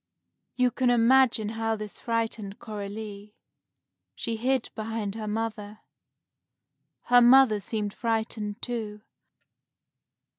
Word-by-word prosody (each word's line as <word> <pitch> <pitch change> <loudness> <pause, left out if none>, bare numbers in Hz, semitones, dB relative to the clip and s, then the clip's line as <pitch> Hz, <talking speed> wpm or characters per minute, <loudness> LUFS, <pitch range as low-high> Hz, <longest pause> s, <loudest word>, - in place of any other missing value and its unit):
You 250 -1 +2
can 255 0 +1
imagine 240 -2 +4
how 225 0 -1
this 210 -1 -8
frightened 225 -3 -3
Coralie. 210 -1 -7 0.8
She 230 - -3
hid 255 +2 0
behind 220 -2 -4
her 220 0 -5
mother. 215 -1 -4 1.2
Her 245 0 +5
mother 245 -3 +6
seemed 205 0 -3
frightened, 220 -2 -3
too. 215 -4 -4
220 Hz, 100 wpm, -27 LUFS, 210-235 Hz, 1.2 s, mother